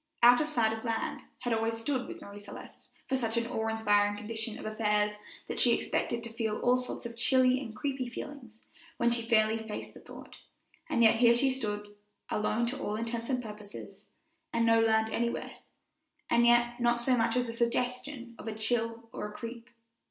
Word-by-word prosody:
"Out 245 +2 +8
of 305 - -1
sight 230 -7 +2
of 220 - -8
land" 230 -2 -2 0.2
had 245 -2 0
always 225 0 0
stood 255 +2 -2
with - - -8
Marie 200 0 -10
Celeste 205 - -11 0.2
for 265 - +1
such 230 -3 -1
an 235 - +1
awe 225 -1 -2
inspiring 205 -2 +2
condition 220 +1 -4
of - - -9
affairs 210 -1 +1 0.3
that - - -4
she - - +6
expected 235 0 -1
to 230 -1 -5
feel 225 -2 -1
all 250 +1 +4
sorts 250 -1 -6
of 235 0 -6
chilly 255 +1 +4
and 225 -5 -7
creepy 265 +1 -2
feelings 240 -3 -9 0.3
when 235 0 +2
she 235 0 +2
fairly 225 -1 +3
faced 220 -1 -6
the - - -12
thought; - - -12 0.5
and 235 - +3
yet 225 0 +6
here 235 0 +6
she 265 +2 +4
stood, 210 -5 -4 0.4
alone 215 +2 +1
to 250 +3 -3
all 210 - -2
intents 230 +2 -3
and 250 -2 0
purposes, 210 -2 -10 0.4
and 230 0 +2
no 230 0 +5
land 220 0 +3
anywhere, 235 +1 -2 0.7
and 235 0 +5
yet 240 0 +4
not 240 0 +2
so 250 +2 +2
much 230 0 +1
as 250 0 +2
the 230 - -5
suggestion 245 +2 -2
of - - -9
a 220 - -3
chill 230 +1 -1
or - - -4
a - - -9
creep. 230 +2 -8
230 Hz, 195 wpm, -30 LUFS, 220-240 Hz, 0.7 s, Out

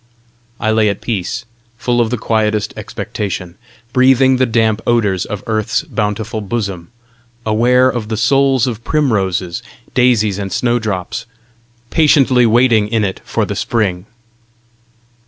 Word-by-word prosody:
I 110 - +1
lay 110 -1 +3
at 100 - -3
peace, 115 +2 -3 0.3
full 120 0 +1
of 115 - +1
the 125 - -1
quietest 110 -1 0
expectation, 90 -4 -5 0.4
breathing 130 0 +4
the 130 0 +2
damp 110 -1 +1
odours 105 -6 +1
of 105 -2 -6
Earth's 110 +4 -1
bountiful 110 -4 -3
bosom, 100 -5 -4 0.6
aware 120 +4 +3
of 120 -4 -2
the 110 0 -3
souls 135 +2 +3
of 115 -3 -4
primroses, 95 - 0 0.3
daisies 110 -6 +2
and 100 -1 -4
snowdrops, 115 -1 -2 0.6
patiently 135 -6 +4
waiting 115 -2 +3
in 110 0 0
it 95 -2 -3
for - - -1
the - - -4
Spring. 100 -5 -1
110 Hz, 130 wpm, -16 LUFS, 105-125 Hz, 0.6 s, breathing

